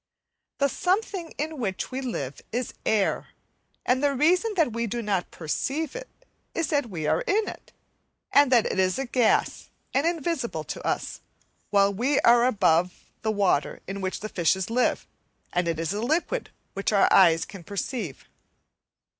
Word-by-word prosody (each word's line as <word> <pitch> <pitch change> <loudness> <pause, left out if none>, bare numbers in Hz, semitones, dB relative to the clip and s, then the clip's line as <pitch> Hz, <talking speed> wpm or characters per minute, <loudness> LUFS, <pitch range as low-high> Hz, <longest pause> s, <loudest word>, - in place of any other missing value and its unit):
The 280 - +3
something 365 - -1
in 310 0 -3
which 195 -2 -3
we 260 +1 -3
live 145 - -4
is 245 +2 -2
air, 210 -3 +1 0.6
and 255 +1 +2
the 285 -1 +2
reason 360 - +2
that 315 - +2
we 235 0 -1
do 235 +2 -3
not 195 -4 -1
perceive 275 - -3
it, - - -7 0.5
is 330 - 0
that 285 -5 0
we 165 -6 -4
are - - +2
in 425 +2 +1
it, - - -9 0.6
and 285 -2 +5
that 240 -3 +5
it - - -1
is 185 +4 +2
a 270 - -2
gas, 240 -2 +1 0.2
and 275 +5 +2
invisible 310 - -2
to - - -7
us; - - -2 0.5
while 200 0 +4
we 255 +8 +1
are 240 +1 +6
above 180 -6 +1
the 220 - -1
water 200 -9 +1
in 195 +1 -5
which 185 0 -3
the 215 - -5
fishes 185 +3 0
live, 250 +2 +1 0.5
and 175 -1 +1
it 165 -1 -1
is 165 +3 -1
a 210 - -2
liquid 320 - -1 0.2
which 195 +2 -1
our 200 -2 +5
eyes 165 -4 +6
can 195 -4 -11
perceive. 200 - -4
235 Hz, 170 wpm, -26 LUFS, 190-285 Hz, 0.6 s, are